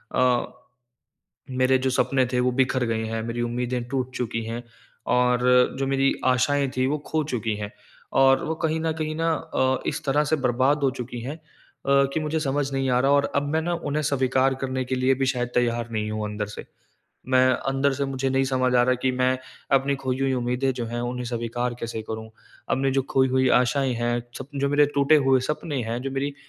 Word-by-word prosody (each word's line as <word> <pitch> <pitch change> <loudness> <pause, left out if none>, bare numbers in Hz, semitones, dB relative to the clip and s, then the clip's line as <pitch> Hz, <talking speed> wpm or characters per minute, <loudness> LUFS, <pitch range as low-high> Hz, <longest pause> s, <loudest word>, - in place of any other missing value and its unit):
अ, 125 -1 +2 1.0
मेरे 130 0 +3
जो - - +3
सपने 130 0 +2
थे 125 - +2
वो 125 +1 +2
बिखर 130 -1 +2
गए 115 -1 -1
हैं, 110 0 -3
मेरी 115 +1 -3
उम्मीदें 125 +1 -2
टूट 130 -1 -2
चुकी 115 -1 -2
हैं 115 +2 -5 0.5
और 125 0 +2 0.3
जो 135 - 0
मेरी 135 0 +2 0.2
आशाएँ 140 +2 +1
थीं 130 0 +2
वो 150 +2 0
खो 155 0 0
चुकी 115 -2 -1
हैं। 105 0 -6 0.5
और 135 0 +4
वो 160 - -1
कहीं 160 0 -1
न 160 0 0
कहीं 155 0 -2
न - - 0 0.3
अ, 130 0 +2
इस - - -2
तरह 145 +2 +2
से - - +5
बर्बाद 130 +4 +2
हो 135 - +3
चुकी 120 0 -6
हैं 135 +6 -5
अ, - - -23 0.7
कि 160 - 0
मुझे 155 +1 -1
समझ 140 -1 -1
नहीं 135 -1 0
आ 125 0 +3
रहा 135 +2 +3
और 145 0 +2
अब 140 - +2
मैं 160 - +2
ना 175 +1 -1 0.2
उन्हें 150 +2 0
स्वीकार 135 -1 +2
करने 130 0 -2
के 130 +1 -2
लिए 130 +1 +2
भी - - +2
शायद 120 -1 -1
तैयार 120 -1 0
नहीं 105 -1 -2
हूँ 110 0 -3
अंदर 105 0 -3
से। - - -8 0.7
मैं 130 0 +5 0.2
अंदर 135 +1 +1
से 140 +1 -1
मुझे 135 -1 -2
नहीं 135 0 +2
समझ 130 -1 +1
आ 120 - +5
रहा 125 +1 +3
कि 130 - +2
मैं 130 0 +2 0.4
अपनी 135 +1 +1
खोई 130 -1 -2
हुई 135 0 +1
उम्मीदें 125 +2 0
जो 120 - -1
हैं 120 +1 -4
उन्हें 125 +1 -3
स्वीकार 120 +1 -2
कैसे 115 -1 -4
करूँ? 110 0 -5 0.4
अपनी 135 +1 +1
जो 135 - +3
खोई 130 0 +3
हुई 130 0 +2
आशाएँ 130 +1 +1
हैं, 120 +1 0 0.2
सप 135 - -8
जो 140 0 0
मेरे 145 +1 +4
टूटे 140 +2 +5
हुए 130 -1 +5
सपने 150 -2 -2
हैं 115 +2 -3
जो 135 - -3
मेरी 140 +1 -2
130 Hz, 215 wpm, -24 LUFS, 120-135 Hz, 1.0 s, से